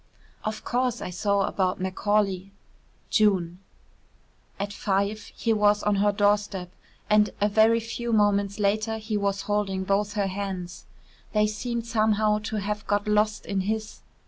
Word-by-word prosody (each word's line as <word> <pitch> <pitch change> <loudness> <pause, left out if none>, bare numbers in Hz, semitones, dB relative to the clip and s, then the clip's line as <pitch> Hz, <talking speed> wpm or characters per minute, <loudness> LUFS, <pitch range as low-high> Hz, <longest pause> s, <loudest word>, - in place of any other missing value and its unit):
"Of 215 0 -4
course 250 -1 0
I - - -5
saw 200 +2 +1
about 185 -2 -1
Macaulay. 195 0 0 0.6
June." 185 -5 +2 1.0
At 200 0 -3
five 200 +2 -1
he 230 - +1
was 210 -1 +3
on 210 -1 +2
her 205 +1 +3
doorstep, 205 -3 0 0.4
and 210 0 +4
a 205 - +3
very 220 +2 +4
few 235 +1 -4
moments 205 -2 +2
later 215 +2 0
he 215 0 -4
was 200 -1 0
holding 205 -2 -1
both 200 +2 0
her 205 -2 0
hands. 185 -2 -5 0.5
They 210 -1 +4
seemed 230 +2 -3
somehow 215 -2 +2
to 220 - -3
have 210 0 -3
got 205 0 0
lost 210 0 +1
in 195 -1 -1
his. 215 +2 -3
205 Hz, 145 wpm, -26 LUFS, 200-215 Hz, 1.0 s, and